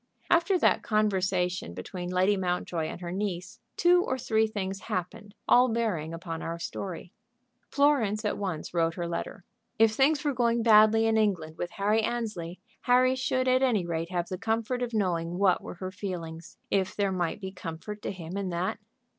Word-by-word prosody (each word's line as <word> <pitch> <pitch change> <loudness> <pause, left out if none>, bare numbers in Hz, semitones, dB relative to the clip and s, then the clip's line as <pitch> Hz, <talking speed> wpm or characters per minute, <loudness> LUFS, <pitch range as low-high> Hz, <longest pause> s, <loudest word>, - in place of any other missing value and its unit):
After 345 +3 +4
that - - +3
conversation 185 - 0
between 175 - -6
Lady 185 +3 +3
Mountjoy 180 -3 -1
and 175 - -7
her 175 -1 -5
niece 185 -2 -4 0.2
two 355 +1 +5
or 260 - -2
three 220 -2 +1
things 195 -3 -4
happened, 200 +4 -5
all 250 +1 +6
bearing 210 -9 -1
upon 165 -1 -6
our 165 +1 -4
story. 180 +1 -6 0.6
Florence 240 -7 +2
at 210 - 0
once 180 -7 -4
wrote 165 -1 +1
her 175 -1 -3
letter. 170 +1 -5 0.3
If 225 -1 +5
things 275 +6 +2
were 290 - +2
going 235 -1 +1
badly 220 0 +6
in 225 0 +3
England 175 -7 0
with 175 - -2
Harry 210 +3 +2
Annesley, 215 -7 -3 0.2
Harry 255 +1 +4
should 260 0 0
at 255 0 +4
any 230 -9 +2
rate 165 0 -3
have 175 -1 -2
the 185 - -5
comfort 225 +3 -1
of 245 -1 -2
knowing 175 -5 -1
what 190 -1 +3
were - - -8
her 185 +1 -6
feelings, 170 -4 -6
if 190 -1 +1
there 200 -1 +1
might 180 0 -1
be 190 -2 -6
comfort 185 +4 -7
to - - -3
him 180 -1 -7
in 195 -2 -2
that. 175 +4 -2
195 Hz, 180 wpm, -28 LUFS, 175-225 Hz, 0.6 s, all